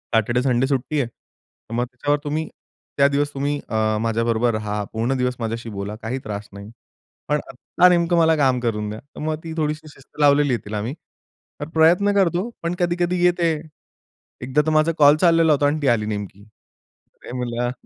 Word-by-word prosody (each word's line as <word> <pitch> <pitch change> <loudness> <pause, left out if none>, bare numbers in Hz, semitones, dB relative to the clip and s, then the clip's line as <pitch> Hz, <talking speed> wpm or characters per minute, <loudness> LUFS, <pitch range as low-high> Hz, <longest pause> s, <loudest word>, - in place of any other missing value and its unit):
"Saturday, 115 +2 +2
Sunday 130 0 +1
सुट्टी 140 +2 -1
आहे. 125 - -2
तर 115 -1 -19
मग 120 +1 0
तेव्हा 145 +4 0
तुम्ही, 155 +1 -2 0.5
त्या 140 0 +6
दिवस 145 +1 0
तुम्ही 145 +1 -1
अ, 110 -1 +1
माझ्याबरोबर 115 +1 +1
रहा. 105 -1 -2
पूर्ण 115 +4 0
दिवस 125 0 0
माझ्याशी 115 0 -4
बोला, 100 0 -5
काही 115 +4 -4
त्रास 105 -1 -6
नाही. 100 +1 -10 0.6
पण 150 0 +1
आता 155 +7 +2
नेमकं 175 -1 +2
मला 160 -1 +4
काम 135 -4 +2
करून 105 -3 -2
द्या." 105 +1 -6
तर 140 +4 -15
मग 155 0 -1
ती 165 -1 -6
थोडीशी 155 0 -2
शिस्त 135 - -19
लावलेली 145 -1 +4
आहे 120 - 0
तिला 105 0 -3
मी. 115 +5 -4 0.7
तर 145 - -4
प्रयत्न 175 +6 +4
करतो 190 +1 +1
पण 170 +1 -1
कधी-कधी 175 0 0
येते. 175 -1 +3 0.9
एकदा 130 +4 +1
तर - - +1
माझा 155 +1 +3
कॉल 145 0 +7
चाललेला 165 -2 +4
होता 145 0 +2
अन् 150 +2 0
ती 140 - 0
आली 115 -4 +2
नेमकी. 100 -2 -5 0.7
अरे - - -12
म्हणलं, 120 0 -2
135 Hz, 185 wpm, -22 LUFS, 115-155 Hz, 0.9 s, कॉल